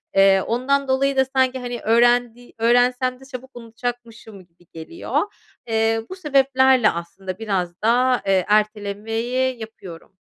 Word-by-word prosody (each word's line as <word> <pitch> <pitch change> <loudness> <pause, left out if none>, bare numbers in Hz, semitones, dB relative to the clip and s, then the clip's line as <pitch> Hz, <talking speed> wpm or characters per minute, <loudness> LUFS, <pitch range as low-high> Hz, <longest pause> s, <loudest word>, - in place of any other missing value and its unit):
Eee, 195 0 +5
ondan 270 +6 0
dolayı 270 +1 +1
da 265 - +4
sanki, 260 -1 0
hani, 245 -1 -5
öğrendi 240 +1 +2
öğrensem 245 +2 +2
de 265 - -15
çabuk 265 -1 -10
unutacakmışım 230 -3 -8
gibi 175 0 -29
geliyor. 165 - -3 0.5
Eee, 225 0 +1
bu 375 - -6
sebeplerle 265 - +3
aslında 185 +2 -7
biraz 185 -5 -3
da, 250 +3 +2
eee, 190 -2 +2
ertelemeyi 225 +4 -1
yapıyorum. 190 -6 -11
235 Hz, 130 wpm, -21 LUFS, 210-255 Hz, 0.5 s, Eee